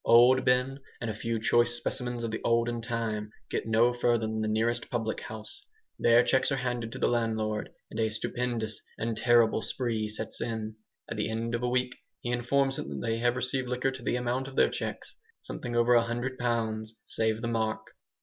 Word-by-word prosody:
Old 125 +3 +7
Ben 125 +2 +2 0.2
and 115 -2 -2
a - - -4
few 115 +2 -2
choice 120 +2 +3
specimens 120 0 -2
of 115 - -2
the 110 - -3
olden 115 0 +2
time 115 -3 -2 0.2
get - - -1
no 115 +2 +4
further 120 -2 +2
than 110 0 -2
the 110 - 0
nearest 115 +2 0
public 115 -2 -1
house. 110 - -8 0.4
Their 120 +1 +6
cheques 130 +2 +2
are - - +2
handed 120 -3 -2
to - - -5
the - - +2
landlord 110 -2 0 0.2
and 110 - -5
a 110 -1 +2
"stupendous 110 0 -2 0.2
and 115 0 -1
terrible 115 -1 +4
spree" 115 -4 -1
sets 105 0 -5
in. 110 -2 -3 0.3
At - - -5
the - - 0
end 115 +1 -2
of 115 - 0
a 125 - +1
week 125 0 0 0.2
he 120 - -2
informs 135 +3 +1
them 70 - -4
that - - -4
they 115 0 0
have 120 +1 +2
received 130 0 -1
liquor 125 +2 0
to 130 -1 -8
the 120 - 0
amount 125 +2 -1
of 135 - -9
their - - +5
cheques - - -5 0.3
something 120 - -5
over 120 +1 +4
a 120 - +7
hundred 120 +3 -3
pounds 110 -2 -1
save 110 0 0
the - - 0
mark! 110 -1 -1
115 Hz, 205 wpm, -29 LUFS, 110-125 Hz, 0.4 s, Old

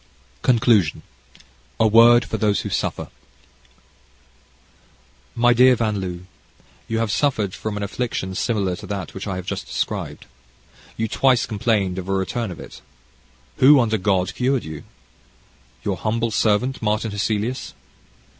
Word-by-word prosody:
CONCLUSION 115 - +2 0.8
A 110 - +4
Word 115 +2 +6
for - - -3
Those 105 -2 +1
Who - - -5
Suffer - - -3 2.3
My 120 +1 +4
dear 125 +2 +6
Van 110 -4 -1
L, 90 -1 -5 0.7
you 115 - -2
have 115 -2 0
suffered 105 -4 0
from 110 -1 -5
an 100 - -3
affection 100 -2 -3
similar 100 -3 -1
to 105 0 -10
that 100 -2 -5
which 95 +2 -6
I 95 - -3
have 90 -1 -6
just - - -5
described. - - -4 0.7
You 110 - -1
twice 130 +2 +2
complained 105 -4 0
of 90 - -7
a - - +1
return 95 +4 -2
of 90 - -8
it. - - -11 0.8
Who, 140 +2 +7
under 110 -3 +1
God, 95 -1 0
cured 130 0 0
you? 80 -1 -8 1.0
Your - - -2
humble 115 +1 -1
servant, 110 +5 +1
Martin 110 0 -1
Hesselius. 110 +4 -2
110 Hz, 140 wpm, -21 LUFS, 95-120 Hz, 2.3 s, Who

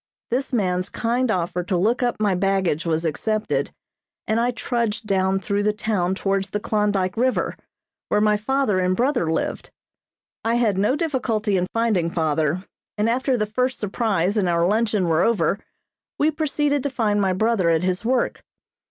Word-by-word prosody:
This 265 +4 -1
man's 185 -6 0
kind 245 +2 0
offer 180 -3 -1
to 185 0 -1
look 220 +9 +1
up 245 -1 +1
my 205 -2 +2
baggage 185 -4 0
was 160 0 0
accepted, 215 +7 -1 0.6
and 220 +1 +1
I 240 +1 +2
trudged 235 -3 -2
down 190 -1 +1
through 200 +2 -1
the 210 +1 +1
town 200 -4 -1
towards 195 0 -1
the 210 - -2
Klondyke 205 -3 0
River, 255 +2 0 0.5
where - - +2
my 210 0 +3
father 215 -2 +1
and 185 0 +1
brother 245 - +1
lived. 160 - -2 0.7
I 230 +1 +1
had 230 -5 +2
no 210 +7 +2
difficulty 250 - 0
in 180 -1 +1
finding 220 -7 +1
father, 160 +2 0 0.3
and 210 +1 +1
after 255 +2 +1
the 215 - 0
first 250 +5 -1
surprise 205 -2 0
and 190 -4 +2
our 170 0 +2
luncheon 210 -1 +1
were 165 0 +2
over 220 -3 +2 0.6
we 305 +2 +3
proceeded 295 -2 0
to 285 - -1
find 215 -5 0
my 190 -2 +2
brother 205 -2 +2
at 165 +1 +2
his 185 +1 -1
work. 250 +1 0
210 Hz, 170 wpm, -22 LUFS, 185-235 Hz, 0.7 s, my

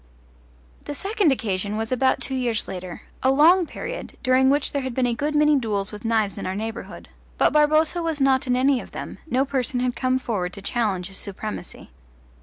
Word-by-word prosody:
The 290 - -5
second 400 -2 +1
occasion 205 -4 -1
was 225 +1 -3
about 260 +1 +2
two 270 - -2
years 245 -4 0
later 180 -2 -7 0.2
a 260 - +3
long 325 +6 +5
period, - - -7
during 260 +1 +4
which 285 +1 +1
there 280 - -1
had 260 -2 -4
been 260 - +2
a 240 - +1
good 295 +5 -2
many 300 0 +5
duels 205 -5 -2
with 210 +2 -9
knives 220 -4 +1
in - - -4
our 185 - -2
neighbourhood; 220 +2 -6 0.3
but - - +3
Barboza 310 +3 +3
was 325 -3 -2
not 270 0 +3
in 250 - +2
any 260 0 +3
of - - -13
them, - - -7
no 260 +1 +2
person 265 -1 -1
had 250 -1 0
come 255 +1 +1
forward 195 -8 -3
to 200 - -9
challenge 200 -5 -1
his 195 - -7
supremacy. 205 - -5
255 Hz, 205 wpm, -23 LUFS, 215-285 Hz, 0.3 s, long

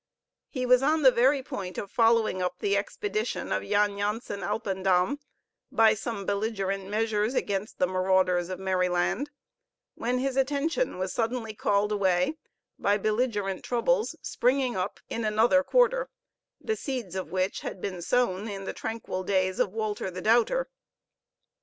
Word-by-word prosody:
He 255 -3 -3
was 250 0 +5
on 310 +3 +2
the 260 - +8
very 260 +3 +3
point 185 -7 -6
of 200 - -5
following 225 -4 +3
up 180 - -2
the 200 -1 0
expedition 415 - -2
of - - +1
Jan 205 -1 +1
Jansen 210 0 -2
Alpendam 195 +3 0 0.5
by 225 -1 +5
some 215 -2 -4
belligerent 195 -2 -2
measures 215 +2 0
against 200 -2 -2
the - - +3
marauders 185 -1 +2
of 185 -1 -5
Merryland, 185 +7 0 0.6
when 245 +2 -1
his 265 +1 -1
attention 285 - 0
was 185 0 -3
suddenly 230 -1 -2
called 205 0 +1
away 190 - +1 0.4
by 205 +1 +2
belligerent 210 -2 -1
troubles 440 - +1
springing 255 0 +1
up 185 +1 -3
in 230 - -3
another 220 +6 +4
quarter, - - +2 0.5
the 440 - -2
seeds 250 - -4
of 190 -3 -4
which 185 +1 0
had - - -6
been 185 -2 -4
sown 215 -1 +1
in 200 -2 -5
the - - -4
tranquil 225 -4 -4
days 185 -1 0
of 190 - +2
Walter 215 -2 -2
the 185 0 -7
Doubter. 240 - +3
210 Hz, 150 wpm, -27 LUFS, 190-250 Hz, 0.6 s, the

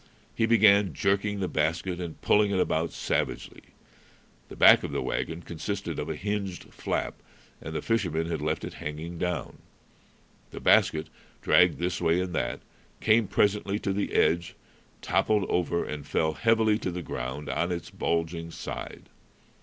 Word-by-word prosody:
He 115 - +1
began 100 -6 +5
jerking 100 +1 0
the 95 - 0
basket 85 +4 -1
and 85 -2 -6
pulling 105 0 +4
it 100 -2 0
about 80 -2 0
savagely. - - -2 0.9
The - - -9
back - - +7
of - - -4
the - - -2
wagon 80 +1 -3
consisted 85 0 -4
of 75 - -4
a 80 - -2
hinged 100 0 -4
flap, - - -3 0.4
and 80 +1 -7
the - - -3
fishermen 90 -8 0
had 85 - -3
left 75 +1 -1
it - - -6
hanging 80 +3 -6
down. 90 -1 -3 0.9
The - - -8
basket, 80 0 +4 0.4
dragged - - +5
this 90 +1 -2
way 85 +2 +3
and 90 -1 -3
that, - - -2 0.4
came 115 -1 +3
presently 100 0 +1
to 100 -2 -2
the 100 +1 -2
edge, 85 0 +2 0.5
toppled 105 -3 +2
over, 85 -1 0
and 75 -1 -5
fell 80 +2 0
heavily 110 +6 +2
to - - -2
the 90 0 -5
ground 65 +3 -5
on 85 +1 -1
its 85 -2 -5
bulging 85 0 -2
side. - - -7
90 Hz, 160 wpm, -27 LUFS, 80-100 Hz, 0.9 s, back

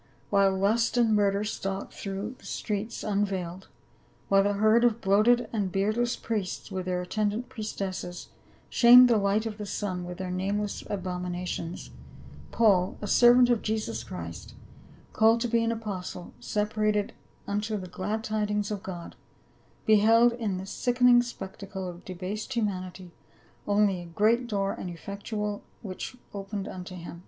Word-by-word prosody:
while 200 -1 +4
lust 225 +5 +2
and 230 -2 +4
murder 200 0 +2
stalked 195 -2 -4
through 200 +4 -5
the - - -17
streets 215 +1 -3
unveiled, 190 -3 -2 0.6
while 195 0 +5
the 205 +1 +1
herd 215 +3 +4
of 235 -2 +3
bloated 215 +5 +3
and 200 -4 -1
beardless 215 +6 +1
priests 210 -2 -4
with 185 -1 -4
their 180 -1 -1
attendant 215 +5 -2
priestesses 190 -5 -5 0.4
shamed 250 +1 +8
the 235 -2 +4
light 200 +2 +1
of 215 -1 -5
the 210 - -4
sun 185 -2 -3
with 180 0 -7
their 185 -1 -4
nameless 200 +3 -2
abominations, 180 -2 -4 0.6
Paul, 195 -5 +3
a - - -5
servant 245 +3 +6
of 235 - +2
Jesus 220 0 -2
Christ, - - -8 0.6
called 225 +1 +4
to 245 - +1
be 230 0 +2
an 230 - +1
apostle, 195 -5 -5
sepa 210 - -2
rated 210 -1 +1 0.3
unto 210 +2 -2
the 190 - -6
glad 205 +5 -3
tidings 210 -1 -1
of 205 -2 -3
God, 180 -5 -7 0.7
beheld 225 +3 +5
in 220 -6 -2
this 190 +1 -7
sickening 245 -1 +4
spectacle 195 -4 -7
of 175 0 -8
debased 195 +7 -5
humanity 185 -5 -3 0.6
only 205 -3 +2
"a - - -9
great 220 +8 +2
door 200 -3 -1
and 180 - -6
effectual 205 +4 -4 0.2
which 190 +4 -6
was 250 - -20
opened 200 0 -5
unto 185 0 -7
him." 170 -1 -8
205 Hz, 150 wpm, -28 LUFS, 190-220 Hz, 0.7 s, shamed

